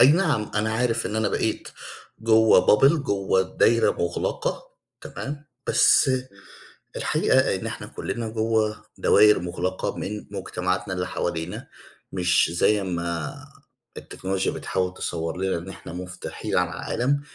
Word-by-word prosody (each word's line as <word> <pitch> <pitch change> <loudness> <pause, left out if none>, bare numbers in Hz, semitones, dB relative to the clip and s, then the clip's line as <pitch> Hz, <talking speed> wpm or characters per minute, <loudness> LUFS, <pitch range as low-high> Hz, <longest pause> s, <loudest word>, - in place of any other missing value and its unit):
أي 125 - +9
نعم 155 - +1
أنا 110 +1 0
عارف 115 -1 0
إن 105 +3 -3
أنا 110 -1 +1
بقيت - - -2 0.5
جوّه 110 0 +5
bubble، 135 +9 +6
جوّه 100 - +1
دايرة 115 +4 +3
مُغلقة 85 0 -2 0.4
تمام، 145 +1 -7 0.2
بس - - +5 0.9
الحقيقة - - +2
إن - - -5
إحنا - - -6
كُلّنا 115 -2 -4
جوّه 110 -1 0
دواير 105 0 +5
مُغلقة 90 +1 -3
من 105 +1 -5
مجتمعاتنا 95 -1 -2
اللي 90 0 -2
حوالينا 85 -2 -4 0.4
مش 90 -2 +2
زي 105 +4 +2
ما 85 -3 -3 0.6
التكنولوجيا 95 0 -2
بتحاول 90 -1 -2
تصوَّر 85 -2 -4
لنا 95 -1 0
إن 85 +3 -8
إحنا 95 -3 -9
مُفتوحين 90 0 -5
على - - +2
العالم 140 +4 -1
95 Hz, 130 wpm, -24 LUFS, 90-110 Hz, 0.9 s, أي